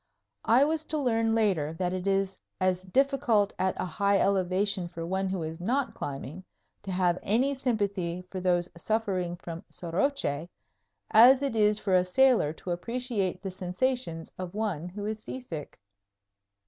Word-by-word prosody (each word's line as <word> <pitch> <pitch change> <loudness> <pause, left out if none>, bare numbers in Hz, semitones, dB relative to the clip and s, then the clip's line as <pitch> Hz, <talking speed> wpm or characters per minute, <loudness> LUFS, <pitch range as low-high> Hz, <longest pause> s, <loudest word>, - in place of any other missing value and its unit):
I 240 +4 +6
was 315 +1 0
to 310 - -2
learn 225 -5 +1
later 185 -9 +1
that 180 +2 -2
it 185 +1 -3
is 195 -1 0 0.2
as 185 -1 +1
difficult 240 0 +2
at 190 0 0
a - - 0
high 200 +4 +1
elevation 190 0 +1
for 165 -1 -6
one 190 +2 -1
who 185 -3 -2
is 160 +2 -6
not 250 +7 0
climbing 145 +5 -6 0.4
to 195 - -6
have 180 -1 +1
any 255 +7 +1
sympathy 200 -9 -1
for 185 - -4
those 175 -1 +2
suffering 185 -2 -1
from 170 -1 -8
soroche 170 - -1 0.6
as 250 +5 +8
it 275 -5 -1
is 210 -1 +4
for 200 -3 -1
a 180 -1 +5
sailor 230 - +4
to 170 +3 -7
appreciate 225 +1 -2
the 190 - -3
sensations 185 -1 -2
of 185 +1 -6
one 190 -6 -2
who 205 +3 -6
is 215 0 -3
seasick. 195 - -7
195 Hz, 160 wpm, -28 LUFS, 180-225 Hz, 0.6 s, as